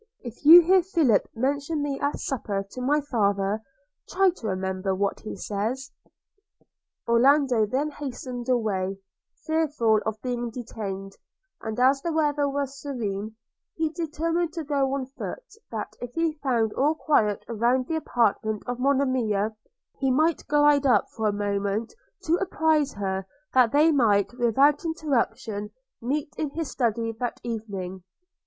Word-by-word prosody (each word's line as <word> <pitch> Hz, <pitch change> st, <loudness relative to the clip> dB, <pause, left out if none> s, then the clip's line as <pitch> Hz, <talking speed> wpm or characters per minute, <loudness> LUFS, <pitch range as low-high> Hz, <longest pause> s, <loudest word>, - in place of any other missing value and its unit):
– -, -, -39 dB
If 235 Hz, -, -25 dB
you 330 Hz, +4 st, +11 dB
hear 370 Hz, +3 st, +4 dB
Philip 325 Hz, -, +2 dB
mention 285 Hz, +5 st, -1 dB
me 280 Hz, -2 st, -2 dB
at 285 Hz, +1 st, -1 dB
supper 205 Hz, -7 st, -3 dB
to 255 Hz, -, -7 dB
my 290 Hz, +4 st, +2 dB
father, 205 Hz, -5 st, 0 dB, 0.5 s
try 380 Hz, 0 st, +3 dB
to 225 Hz, -, -5 dB
remember 190 Hz, 0 st, -2 dB
what 200 Hz, +1 st, -1 dB
he -, -, -7 dB
says.' 235 Hz, +7 st, -3 dB, 1.2 s
Orlando 250 Hz, -1 st, +4 dB
then 280 Hz, +7 st, -1 dB
hastened 255 Hz, -3 st, -6 dB
away, 195 Hz, -6 st, 0 dB, 0.5 s
fearful 295 Hz, -9 st, +2 dB
of 220 Hz, 0 st, -3 dB
being 240 Hz, -1 st, -2 dB
detained; 205 Hz, -5 st, -6 dB, 0.5 s
and 220 Hz, +1 st, -4 dB
as 270 Hz, +2 st, +4 dB
the 335 Hz, -, -2 dB
weather 295 Hz, -2 st, +1 dB
was 275 Hz, -1 st, -3 dB
serene, 220 Hz, -6 st, -4 dB, 0.4 s
he 320 Hz, -1 st, 0 dB
determined 330 Hz, +1 st, -2 dB
to 330 Hz, -2 st, -4 dB
go 275 Hz, -2 st, 0 dB
on 270 Hz, -2 st, -3 dB
foot, 275 Hz, -, -7 dB, 0.2 s
that, -, -, -5 dB
if 245 Hz, 0 st, -7 dB
he 330 Hz, -1 st, +1 dB
found 235 Hz, -6 st, +1 dB
all 295 Hz, +4 st, +2 dB
quiet 215 Hz, -11 st, +1 dB
round 240 Hz, +3 st, +1 dB
the 320 Hz, +4 st, -2 dB
apartment 220 Hz, -6 st, 0 dB
of 245 Hz, 0 st, -4 dB
Monimia, 250 Hz, -6 st, +1 dB, 0.4 s
he 270 Hz, -, +1 dB
might 310 Hz, +5 st, +1 dB
glide 290 Hz, -1 st, +4 dB
up 250 Hz, -, +3 dB
for 220 Hz, -1 st, -1 dB
a -, -, +2 dB
moment 205 Hz, +2 st, -2 dB, 0.3 s
to 330 Hz, +2 st, +2 dB
apprise 315 Hz, -6 st, +1 dB
her 190 Hz, -1 st, -3 dB, 0.3 s
that 250 Hz, -3 st, +5 dB
they 305 Hz, +3 st, +5 dB
might 220 Hz, -7 st, +3 dB
without 265 Hz, +5 st, +3 dB
interruption 250 Hz, -10 st, -2 dB, 0.3 s
meet 285 Hz, +5 st, -2 dB
in 305 Hz, -, -1 dB
his 315 Hz, +1 st, -4 dB
study 230 Hz, -2 st, 0 dB
that 245 Hz, -1 st, -3 dB
evening. 200 Hz, -5 st, -5 dB
255 Hz, 150 wpm, -26 LUFS, 215-295 Hz, 1.2 s, you